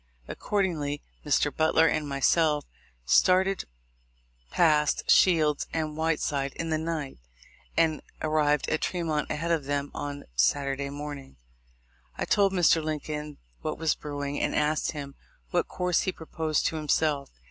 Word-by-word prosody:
Accordingly, 160 -8 -2 0.2
Mr. - - +1
Butler 160 +1 +4
and 155 -2 0
myself 150 +2 +2 0.4
started, 185 - +3 0.8
passed 150 - +2
Shields 155 -5 +4
and 155 -2 -2
Whiteside 150 -3 -1
in 165 -1 -4
the 155 - +1
night, 160 - -4 0.6
and 160 -2 +2 0.2
arrived 150 -2 +1
at 155 - 0
Tremont 165 -4 -1
ahead 165 +3 -2
of 160 -4 +1
them 145 0 -2
on 145 0 -5
Saturday 140 - +1
morning. 145 - -7 0.8
I - - -1
told 200 -2 +3
Mr. 170 -3 +3
Lincoln 150 -1 -4 0.2
what - - -3
was 160 -1 +1
brewing, 145 -1 -4
and - - 0
asked 150 +1 +1
him 140 -2 -6 0.4
what - - +1
course 180 -1 0
he 190 - -1
proposed 160 -2 -2
to 160 - 0
himself. 150 -1 0
150 Hz, 135 wpm, -27 LUFS, 145-165 Hz, 0.8 s, Butler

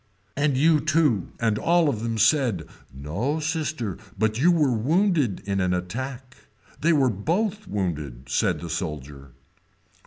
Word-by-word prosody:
And 145 -1 +1
you 155 +2 +4
too 155 - +1
and 110 -2 +1
all 170 -1 +3
of 115 -7 -1
them 115 -1 -2
said, 110 - +2 0.3
no 90 - -3
sister 155 - -2 0.2
but 110 +2 0
you 175 +4 +6
were 150 -7 +3
wounded 150 - +1
in 100 -1 -1
an 90 -1 +1
attack. 125 +8 -5 0.4
We 165 - +3
were 135 -6 +3
both 190 - -1
wounded, 75 -10 -4
said - - 0
the 85 - -6
soldier. 75 -6 -5
120 Hz, 145 wpm, -25 LUFS, 90-155 Hz, 0.4 s, you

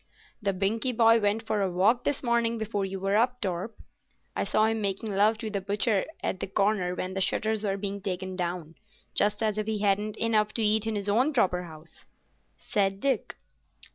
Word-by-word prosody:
"The 200 -2 +1
Binkie 220 +6 -1
boy 230 0 +6
went 210 +1 0
for 215 -2 0
a 195 - +1
walk 205 +7 +2
this 285 -1 0
morning 235 -1 +1
before 210 -2 -2
you 195 0 -5
were 195 +1 0
up, 250 +3 +2
Torp. 190 +2 -3 0.6
I - - 0
saw 215 - +2
him 225 0 0
making 200 +1 -2
love 215 +3 +4
to 215 0 -5
the 200 -1 -2
butcher 205 +1 +1 0.2
at 190 - -2
the - - -3
corner 195 -2 +1
when 185 +1 -4
the 195 - -2
shutters 220 +2 0
were 195 -1 0
being 200 0 -4
taken 185 -1 -4
down—just 180 +4 -3
as 215 -1 0
if 215 - -3
he 220 -1 0
hadn't 205 +1 +1
enough 215 -2 +1
to 230 - 0
eat 215 +1 +2
in 220 - -1
his 205 -1 -3
own 250 +9 +2
proper 180 -7 +1
house," 160 0 -12 0.5
said 195 -1 0
Dick. 275 +4 -1
205 Hz, 200 wpm, -28 LUFS, 195-220 Hz, 0.6 s, boy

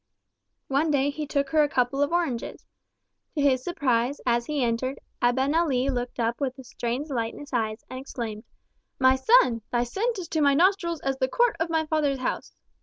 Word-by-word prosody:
One 280 +4 +1
day 285 -1 +2
he 300 +1 -5
took 280 -1 0
her 310 -1 +4
a 295 - +2
couple 255 +1 0
of 285 - +1
oranges. 330 -9 -2 0.7
To 295 - 0
his 260 -3 +3
surprise, 265 -5 0
as 235 -1 +1
he 295 -3 0
entered, 245 +3 -1 0.2
Abenali 265 +2 +2
looked 245 -1 -4
up 235 +3 -1
with 260 -1 -2
a 265 - -10
strange 245 +4 -4
light 230 -3 -2
in - - -10
his 290 -1 -12
eyes, 220 -2 -1
and 255 - -7
exclaimed, 230 -5 -6 0.5
"My 260 0 +5
son! 260 - +4
thy 240 -1 +2
scent 425 - -2
is 360 -3 -5
to 315 - 0
my 280 -1 +4
nostrils 340 -1 +2
as 270 -1 -1
the 260 - +2
court 475 - +2
of 325 +1 0
my 320 -1 +1
father's 300 -3 +1
house!" 255 - -4
270 Hz, 195 wpm, -26 LUFS, 245-305 Hz, 0.7 s, My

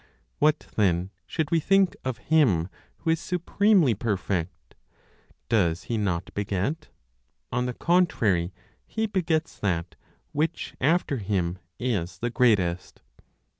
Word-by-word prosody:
What 150 +1 +3 0.2
then 95 -2 +2 0.2
should 155 - -2
we 165 - +4
think 195 +3 +3
of 130 -3 -2 0.2
Him 100 - +4 0.3
who 160 - 0
is 165 - +1
supremely 180 - +3
perfect? 95 -5 -3 0.7
Does 90 -6 +2
He 115 +2 -2
not 95 -4 -2
beget? 100 - -2 0.6
On 125 +1 0
the 125 - -4
contrary, 110 - +2 0.4
He 220 0 -1
begets 170 -6 -1
that 90 -3 -1 0.4
which, 160 +3 -2
after 145 0 +2
Him, 95 -4 -1 0.2
is 95 -9 -2
the 120 +6 -2
greatest. 100 -9 +1
115 Hz, 120 wpm, -26 LUFS, -, 0.7 s, we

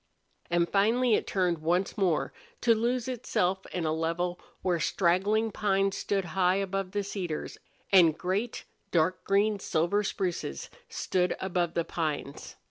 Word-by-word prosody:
And 170 0 +2
finally 225 +5 +3
it - - +1
turned 180 -4 +1
once 175 +4 0
more, 185 -7 +1 0.3
to 235 - +5
lose 235 +2 0
itself 195 -6 -1
in 175 -3 -3
a 155 - +1
level 170 +2 -1 0.2
where 180 -2 +1
straggling 200 +7 +2
pines 195 -1 +1
stood 195 -2 -1
high 185 -1 +3
above 195 -1 -2
the 205 +1 -2
cedars, 185 -6 -4 0.3
and 170 -5 +6
great, 200 +6 -2 0.2
dark 175 +2 +1
green 200 +1 +2
silver 175 +3 +1
spruces 175 - -3 0.2
stood 180 -1 0
above 175 -3 -1
the 170 -1 +1
pines. 155 -4 -4
185 Hz, 140 wpm, -29 LUFS, 170-200 Hz, 0.3 s, and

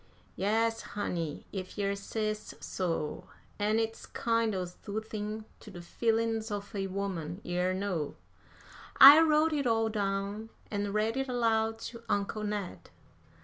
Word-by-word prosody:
"Yes, 225 +3 +1 0.2
honey, 165 -7 -3
if 185 0 -6
yer 200 -1 0
says 215 +1 -3
so; 165 -5 -3 0.3
an' 210 +1 +2
it's 225 0 -2
kind 230 -2 0
o' 185 -1 -1
soothin' 215 +3 -5
to - - -12
de 175 - -9
feelin's 225 +4 0
of 205 +1 -5
a 195 -2 -2
woman, 185 -3 -3
yer 180 +1 0
know." 185 -6 -2 0.8
I 280 +3 +12
wrote 315 0 +4
it 285 -3 0
all 225 -1 +2
down 200 +1 -2 0.2
and 205 -1 -1
read 220 +3 +1
it 270 0 -1
aloud 225 -2 +1
to 235 -1 -11
Uncle 205 +1 -1
Ned. 205 -3 -4
210 Hz, 140 wpm, -31 LUFS, 195-225 Hz, 0.8 s, I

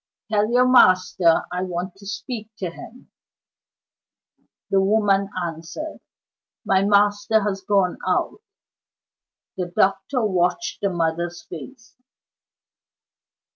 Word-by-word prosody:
"Tell 210 0 +2
your 250 +1 +4
master 185 -7 +4
I 180 0 -2
want 180 0 -4
to 200 0 -13
speak 210 +3 -6
to 180 -3 -4
him." 245 +8 -13 1.6
The 195 - +4
woman 200 -1 +2 0.2
answered: 165 - -7 0.7
"My 190 0 +3
master 205 +2 +3
has 200 -1 -2
gone 195 -2 +1
out." - - -1 1.2
The 180 -2 -2
doctor 195 +7 +1
watched 185 - -1
the 200 - +1
mother's 170 0 -2
face. 230 - -11
195 Hz, 100 wpm, -22 LUFS, 180-210 Hz, 1.6 s, your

